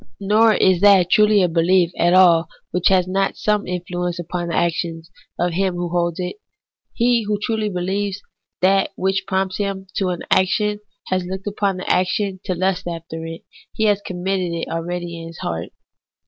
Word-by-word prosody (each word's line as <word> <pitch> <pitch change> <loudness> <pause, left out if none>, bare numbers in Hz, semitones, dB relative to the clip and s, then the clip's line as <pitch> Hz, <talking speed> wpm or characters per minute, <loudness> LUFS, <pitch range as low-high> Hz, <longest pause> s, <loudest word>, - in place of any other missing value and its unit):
Nor 215 +2 +4
is 185 -2 +3
that 195 -3 +5
truly 210 -2 +5
a - - +3
belief 170 +1 +2
at 175 +1 +3
all 170 -3 +6 0.2
which 180 0 +1
has 185 -2 +3
not 195 +1 0
some 210 -1 0
influence 180 0 -3
upon 175 0 -4
the 170 - -2
actions 165 0 -2 0.3
of 175 -1 0
him 190 0 0
who 175 0 -3
holds 170 -1 -1
it. 180 - -4 0.6
He 240 0 +3
who 210 -1 0
truly 215 0 -1
beheves 195 +2 -2 0.4
that 195 +1 +3
which 190 +1 -1
prompts 190 0 -1
him 195 -2 -3
to 195 - +1
an 175 -1 -3
action 210 +2 +2 0.3
has 185 -1 0
looked 190 +2 -6
upon 200 -2 -1
the 185 - -7
action 190 +1 0
to 185 - -1
lust 185 0 -1
after 165 -1 -6
it, 165 0 -8 0.3
he 220 - -1
has 205 -2 +3
committed 185 -1 -2
it 165 - -3
already 170 0 -4
in 165 - -8
his 165 - -11
heart. 85 0 -4
185 Hz, 180 wpm, -20 LUFS, 175-195 Hz, 0.6 s, all